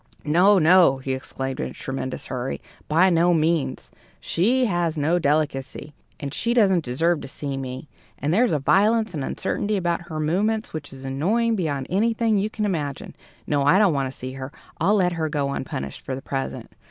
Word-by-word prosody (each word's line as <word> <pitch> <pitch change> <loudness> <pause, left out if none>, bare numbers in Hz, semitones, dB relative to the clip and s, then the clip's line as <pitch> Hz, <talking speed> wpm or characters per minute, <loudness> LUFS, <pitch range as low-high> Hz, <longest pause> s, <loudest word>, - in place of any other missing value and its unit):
"No, 180 +7 +5
no!" 170 -4 +5
he 130 0 -4
exclaimed 135 0 -5
in - - -2
a - - -10
tremendous 130 -1 -5
hurry; 130 0 -4 0.3
"by 175 +5 +4
no 170 +1 +4
means! 160 -1 0 0.3
She 245 +9 +1
has 175 -6 0
no 160 +4 +2
delicacy. 145 -2 -1 0.3
And 140 -1 -5
she 235 +7 -1
doesn't 190 -7 +4
deserve 160 +6 0
to - - -7
see 140 0 -5
me. 130 +1 -6 0.3
And 145 +4 -1
there's 235 +5 +3
a 155 - +2
violence 215 - +2
and 145 -4 -3
uncertainty 205 +9 -2
about 170 -2 -1
her 155 -1 -4
movements 205 +8 0
which 155 -2 -6
is 135 0 -11
annoying 210 - +1
beyond 145 -8 -2
anything 220 +2 +2
you 205 +2 -1
can 215 -1 -3
imagine. 150 -8 -3 0.3
No, 145 -1 +1
I 145 +6 +5
don't 200 -5 +4
want 135 -2 -1
to - - -17
see 130 +1 -6
her! 130 +1 -7 0.3
I'll 195 +6 +3
let 180 -3 +2
her 160 -2 -2
go 145 -2 -1
unpunished 70 - -5
for 130 - -4
the 135 - -7
present. 135 -1 -4
160 Hz, 190 wpm, -23 LUFS, 135-195 Hz, 0.3 s, No